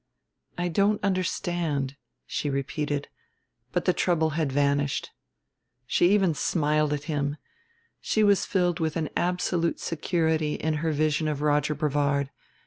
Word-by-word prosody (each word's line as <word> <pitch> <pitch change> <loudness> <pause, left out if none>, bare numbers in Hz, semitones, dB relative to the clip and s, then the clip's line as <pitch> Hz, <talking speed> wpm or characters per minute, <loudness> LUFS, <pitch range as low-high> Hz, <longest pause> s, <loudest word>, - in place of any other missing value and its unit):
"I 175 0 0
don't 200 +5 +2
understand," 175 -7 -1 0.3
she 145 - -2
repeated, 140 +1 -2 0.6
but - - -1
the - - +4
trouble 160 -3 +1
had 155 -2 -1
vanished. 140 0 0 0.7
She 175 +7 +3
even 195 -5 +3
smiled 150 -1 +1
at 145 -1 -2
him: 145 -1 -2 0.6
she 215 - +1
was 205 -2 +4
filled 180 -3 +1
with 160 -2 -1
an 160 -2 -2
absolute 175 -1 0
security 160 -2 0
in 160 0 -1
her 165 -1 +1
vision 155 +1 +1
of 150 -1 -2
Roger 150 0 +2
Brevard. 145 -2 0
155 Hz, 135 wpm, -26 LUFS, 145-175 Hz, 0.7 s, the